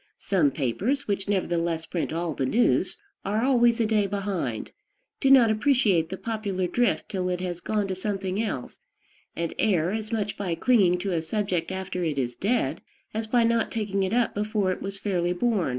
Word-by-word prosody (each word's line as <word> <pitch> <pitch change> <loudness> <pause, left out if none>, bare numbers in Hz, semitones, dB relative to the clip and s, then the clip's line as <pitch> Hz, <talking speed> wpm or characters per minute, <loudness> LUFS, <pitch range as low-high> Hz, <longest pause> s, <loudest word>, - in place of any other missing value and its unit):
Some 175 -7 +2
papers, 170 - -1
which 200 -1 -2
nevertheless 170 -4 0
print 170 -1 -3
all 165 0 -2
the 135 -2 -1
news, 235 - +2 0.3
are 210 +3 0
always 240 -3 +4
a 230 - +3
day 215 -2 +2
behind, 195 - -3 0.5
do 270 - +2
not 250 -5 +7
appreciate 215 - +2
the 190 - -5
popular 205 -5 -2
drift 235 +5 +1
till 185 -2 -2
it 180 -1 -1
has 175 -1 -4
gone 210 -2 -1
to 190 - -2
something 195 0 -2
else, 175 - -4 0.6
and 170 -1 -2
err 180 -5 +2
as 215 0 -4
much 210 -3 -2
by 180 -4 -2
clinging 190 -2 +3
to 195 - -2
a 165 -2 0
subject 180 -1 -2
after 190 -1 -3
it 155 -4 -1
is 125 -2 -1
dead 230 - 0 0.3
as 220 +1 -3
by 235 +1 +3
not 230 0 +1
taking 205 -3 -1
it 190 - 0
up 240 0 +2
before 210 -2 0
it - - -4
was 195 0 -5
fairly 180 -3 0
born. 210 - +1
195 Hz, 190 wpm, -26 LUFS, 175-220 Hz, 0.6 s, not